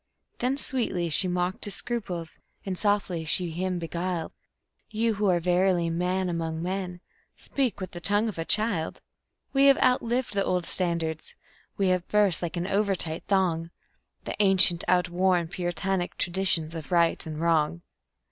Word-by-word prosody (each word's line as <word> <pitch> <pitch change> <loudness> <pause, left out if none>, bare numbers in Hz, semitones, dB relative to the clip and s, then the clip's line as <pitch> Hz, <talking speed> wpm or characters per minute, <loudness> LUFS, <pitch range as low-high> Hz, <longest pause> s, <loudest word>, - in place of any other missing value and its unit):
Then 255 +3 0
sweetly 205 - -2
she 185 +5 +3
mocked 180 +1 -2
his 205 - -4
scruples, 190 -9 -4 0.3
and 190 -2 -3
softly 200 -4 0
she 170 +2 0
him 180 +2 -2
beguiled: 170 0 -3 0.6
"You, 225 +1 +1
who 205 -1 0
are 175 -1 +3
verily 175 -1 +1
man 180 +2 -1
among 165 -2 -3
men, 180 -1 -4 0.4
speak 265 -6 -2
with 185 - -6
the 175 - -8
tongue 205 +4 +2
of 205 -7 -5
a - - -1
child. 200 -3 +1 0.5
We 275 0 +4
have 275 -1 +6
outlived 250 -2 +1
the 200 -1 +1
old 180 -2 -1
standards; 170 -4 -2 0.4
we 195 -2 +2
have 180 -1 0
burst, 205 -5 +2
like 175 0 -4
an 170 - -2
over 200 0 +1
tight 160 -2 -3
thong, 175 -4 +1 0.5
The - - -5
ancient, 190 -3 +6
outworn, 180 -1 +2
Puritanic 180 +1 -2
traditions 175 -3 +1
of 160 -2 -8
Right 170 -1 +3
and 155 -1 -5
Wrong." 165 0 +1
180 Hz, 155 wpm, -26 LUFS, 170-200 Hz, 0.6 s, have